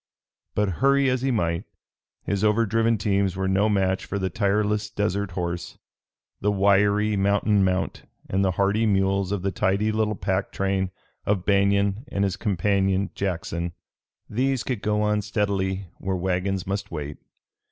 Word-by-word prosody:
But 105 0 +2
hurry 140 -1 +4
as 130 -1 0
he 135 - 0
might, 85 -8 0 0.6
his 100 0 -1
overdriven 115 +1 +2
teams 100 -2 +1
were 95 0 -1
no 100 +3 +2
match 95 -2 +1
for 100 - -4
the 95 -2 -2
tireless 105 +1 +1
desert 100 -2 -1
horse, 85 -1 -4 0.6
the 105 - +1
wiry 100 +1 +3
mountain 100 +1 +2
mount 95 0 0 0.3
and 95 +1 +1
the 95 - +3
hardy 100 +4 +2
mules 95 -1 +1
of 100 -3 -2
the 100 - 0
tidy 105 +3 +1
little 110 0 0
pack 95 0 -1
train 95 -1 0 0.4
of 100 -3 +1
Banion 100 +1 +2
and 100 -5 -1
his 95 -2 0
companion 100 0 +1
Jackson. 85 -2 -3 0.5
These 130 +3 0
could 125 -6 -3
go 105 0 +1
on 105 0 +1
steadily 100 -2 -1
where 95 0 -2
wagons 95 +1 -1
must 100 +1 -3
wait. 75 -3 -5
100 Hz, 150 wpm, -25 LUFS, 95-105 Hz, 0.6 s, hurry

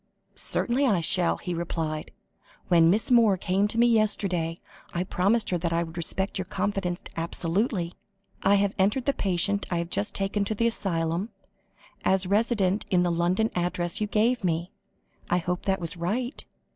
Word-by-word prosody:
"Certainly 265 +3 0
I 200 -7 +3
shall," 175 +1 +2
he 180 - -4
replied. 160 -2 -3 0.6
"When 165 -2 +6
Miss 210 +7 +2
Moore 225 -5 +5
came 190 +3 +1
to 220 - -4
me 235 - +5
yesterday, 195 -7 +1 0.4
I 175 - +1
promised 200 +5 +1
her 175 - +1
that 170 0 -2
I 170 0 +1
would 165 0 -9
respect 190 +4 0
your 185 - -2
confidence 195 -2 -2
absolutely. 170 +2 -1 0.5
I 200 +1 +4
have 200 0 +2
entered 210 +7 +2
the 280 - +2
patient 200 0 0
I 175 - 0
have 170 +1 -3
just 200 +3 -2
taken 195 +1 0
to 215 - -1
the 230 - +1
asylum, 175 -3 0 0.7
as 190 0 +2
resident 205 -1 +1
at 180 -2 +4
the 175 - +1
London 175 +6 +1
address 175 +1 -1
you 210 - +1
gave 225 +3 +1
me. 170 0 -1 0.6
I 175 - +3
hope 180 0 -2
that 195 -1 +1
was 170 -1 -5
right? 225 - -2
190 Hz, 170 wpm, -26 LUFS, 175-210 Hz, 0.7 s, When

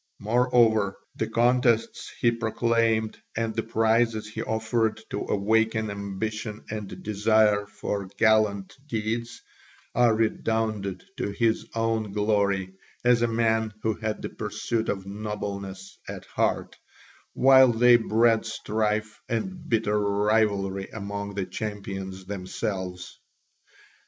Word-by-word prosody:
Moreover, 110 -3 +3 0.2
the - - -1
contests 120 -1 +2
he 120 - +4
proclaimed 115 -1 0 0.2
and 115 -1 -1
the 115 - -1
prizes 115 -1 +1
he 105 - -5
offered 110 0 0
to 100 - -2
awaken 110 +1 +1
ambition 105 +2 -5
and 105 -3 -6
desire 105 0 +3
for 100 -1 -4
gallant 110 -3 +2
deeds 115 0 -3 0.5
all 120 -1 +4
redounded 110 -3 -1
to - - -2
his 110 +2 0
own 115 -2 0
glory 100 -3 +1 0.3
as 120 -1 +5
a 120 - +3
man 110 -1 +1
who 110 - +2
had 110 0 -4
the - - -3
pursuit 115 -1 -3
of 95 -1 -2
nobleness 100 -2 -6
at - - -7
heart, - - -1 0.5
while 130 -1 +7
they 120 +1 +6
bred 115 0 +3
strife 110 -1 -2
and 165 +8 -3
bitter 105 -2 +2
rivalry 100 -1 +1
among 100 -1 -5
the 100 -2 -1
champions 95 -1 -5
themselves. 95 -2 -5
110 Hz, 115 wpm, -26 LUFS, 100-115 Hz, 0.5 s, while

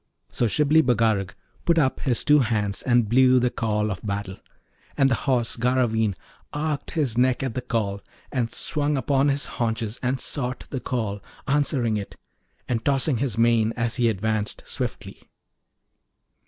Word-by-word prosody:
So 120 - +1
Shibli 150 +6 +4
Bagarag 110 -7 +1 0.3
put 170 -1 +2
up 135 -5 +2
his 125 -5 +1
two 150 0 +5
hands 105 -5 0
and 120 -3 +2
blew 130 +3 +5
the 125 0 +1
call 105 -2 -1
of 95 - -6
battle, 100 -2 -4 0.6
and 135 -1 +4
the 130 - -1
Horse 120 -3 +1
Garraveen 115 -4 +1 0.4
arched 150 0 -3
his 125 -7 +1
neck 130 +1 +2
at 130 -4 -2
the 130 - -3
call, 105 -5 -2 0.3
and 120 -4 -1
swung 145 +2 -1
upon 140 0 +2
his 140 0 0
haunches, 115 -1 -3
and 130 +1 -1
sought 130 -2 -3
the 135 - -2
call, 110 -6 -3 0.3
answering 135 -6 +1
it, 100 - -6 0.5
and 115 -2 -1
tossing 140 -1 +2
his 125 -2 -2
mane 115 -1 +3
as 115 0 0
he 120 -2 +3
advanced 110 0 -2
swiftly. - - -6
120 Hz, 155 wpm, -24 LUFS, 110-135 Hz, 0.6 s, two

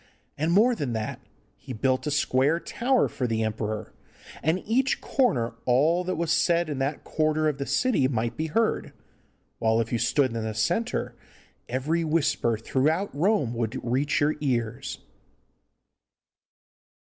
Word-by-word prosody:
And 155 +3 0
more 220 +7 +5
than 140 - -3
that, 110 -1 -4 0.3
he 130 - -9
built 130 +5 0
a - - +1
square 145 +1 +2
tower 250 +7 +1
for 125 - -3
the 110 -1 0
emperor, 110 0 -3 0.5
and 160 +4 +2
in - - -11
each 255 +4 +2
corner 180 - +1
all 155 +8 +3
that 185 - -1
was 165 0 -1
said 170 -1 +2
in 140 - -3
that 135 +3 -2
quarter 155 0 +1
of 145 -2 -1
the 140 - -3
city 245 - +2
might 120 -2 -2
be 160 - -2
heard, 225 +8 0 0.7
while 110 0 +2
if 115 +1 -2
you 120 - +1
stood 120 +1 +1
in 115 - -2
the 110 -1 -4
centre 175 - -1 0.6
every 145 +7 0
whisper 150 -7 +1
throughout 155 - 0
Rome 155 - +1
would 115 -2 -2
reach 130 +5 0
your 150 +1 +3
ears. 120 - -2
140 Hz, 155 wpm, -26 LUFS, 115-170 Hz, 0.7 s, more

